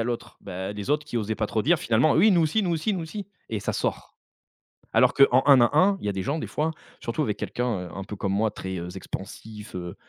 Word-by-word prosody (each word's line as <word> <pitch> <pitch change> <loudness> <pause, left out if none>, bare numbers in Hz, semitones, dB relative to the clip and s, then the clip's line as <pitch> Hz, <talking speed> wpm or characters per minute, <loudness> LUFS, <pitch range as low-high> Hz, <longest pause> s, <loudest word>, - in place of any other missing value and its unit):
a - - 0
l'autre. 120 0 -4
Beh, 95 +1 -5
les 105 +5 -5
autres 150 0 +1
qui 120 - -5
osaient 110 0 -2
pas 110 0 -1
trop 110 0 -1
dire 170 +4 +3
finalement: 120 +4 +3
«Oui 205 +7 +5
nous 180 -3 +4
aussi, 165 +7 +2
nous 180 - 0
aussi, 170 +6 0
nous 180 - -3
aussi.» 195 +5 -6 0.2
et 110 -3 -2
ça - - -2
sort. - - -3 0.8
Alors - - +5
qu'en 130 -2 +6
un 135 -3 +8
à 120 +5 +3
un, 195 +5 +5
il - - -7
y 105 - +1
a - - +1
des 95 -1 -3
gens 145 +10 -1
des - - -3
fois, 155 +2 -1 0.3
surtout 120 +6 -1
avec 105 -6 -1
quelqu'un, 115 -8 -2
heu, - - -11
un 95 - -4
peu 105 - -7
comme 100 -1 -2
moi, 105 +2 +1
très, 95 -2 -5
heu, 85 0 -5
expansif, 105 +3 -8
heu 90 -1 -5
115 Hz, 270 wpm, -26 LUFS, 100-155 Hz, 0.8 s, un